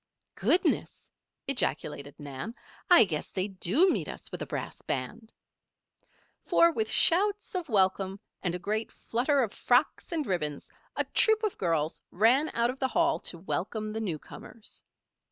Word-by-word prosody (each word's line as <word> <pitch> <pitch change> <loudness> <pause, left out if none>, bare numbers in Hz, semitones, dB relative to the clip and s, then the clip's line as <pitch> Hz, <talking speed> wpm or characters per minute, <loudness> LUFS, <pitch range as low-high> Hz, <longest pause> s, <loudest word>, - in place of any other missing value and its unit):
"Goodness!" 365 - 0 0.4
ejaculated 150 - -1
Nan. 145 - -7 0.3
"I 350 -7 +9
guess 160 -7 -3
they 190 +1 -1
do 200 - +3
meet - - 0
us - - -9
with - - -6
a - - -4
brass - - -5
band!" 225 -1 -4 1.1
For, 335 0 +4
with 220 -7 -2
shouts 405 - +3
of 360 -5 -3
welcome, 195 -1 +1 0.2
and 180 -2 -1
a - - -1
great 215 +5 -3
flutter 265 +4 0
of 220 - -3
frocks 250 +8 +1
and 320 -3 -1
ribbons, 155 - -3 0.2
a - - +1
troop 440 0 +2
of 425 - 0
girls 165 -3 -1
ran 245 - +3
out 235 +1 +2
of 265 - -12
the 265 - +1
Hall 335 +4 +1
to 170 - -5
welcome 215 +4 -3
the 220 - -3
newcomers. 205 +4 -7
220 Hz, 155 wpm, -29 LUFS, 185-295 Hz, 1.1 s, I